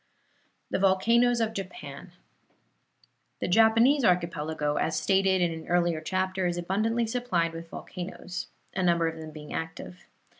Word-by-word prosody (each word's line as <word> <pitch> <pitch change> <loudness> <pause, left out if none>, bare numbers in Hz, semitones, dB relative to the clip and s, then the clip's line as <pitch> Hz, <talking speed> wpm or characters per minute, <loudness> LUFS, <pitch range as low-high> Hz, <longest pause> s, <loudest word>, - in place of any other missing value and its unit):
THE - - 0
VOLCANOES 230 +6 +3
OF 220 -1 0
JAPAN 195 - -8 1.3
The - - -2
Japanese 230 +7 +5
archipelago, 160 -5 0
as 160 -1 0
stated 190 -1 +2
in 175 -1 +2
an 160 0 -7
earlier 175 -2 +1
chapter, 185 +2 -1
is 175 0 -2
abundantly 215 +7 0
supplied 220 -9 -1
with 165 0 -8
volcanoes, 180 +1 -6 0.3
a 190 - 0
number 170 -2 +3
of 165 0 -4
them 160 -1 -7
being 150 -1 -9
active. 165 +2 -6
180 Hz, 140 wpm, -28 LUFS, 165-215 Hz, 1.3 s, Japanese